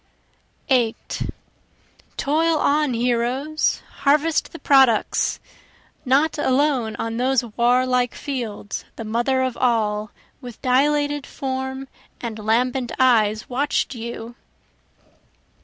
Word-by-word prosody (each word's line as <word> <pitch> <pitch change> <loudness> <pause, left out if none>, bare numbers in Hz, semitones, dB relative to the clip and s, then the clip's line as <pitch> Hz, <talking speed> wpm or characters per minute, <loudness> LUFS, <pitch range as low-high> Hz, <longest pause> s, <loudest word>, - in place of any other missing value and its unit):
8 240 -4 0 0.9
Toil 320 +3 +2
on 295 -3 +2
heroes! 250 +6 0 0.2
harvest 300 +3 +2
the - - -8
products! 265 -8 +3 0.7
Not 285 +5 +2
alone 260 -5 +1
on 225 0 -3
those 255 0 +2
warlike 250 +1 +2
fields 235 -7 -5
the 230 - -6
Mother 240 +4 +1
of 255 -2 -2
All, 215 -4 +1 0.3
With 245 -3 -10
dilated 290 +2 +1
form 265 0 -4 0.3
and 225 -2 -5
lambent 245 +3 0
eyes 220 -4 +3
watch'd 275 +2 -1
you. 235 0 -7
255 Hz, 95 wpm, -22 LUFS, 235-280 Hz, 0.9 s, products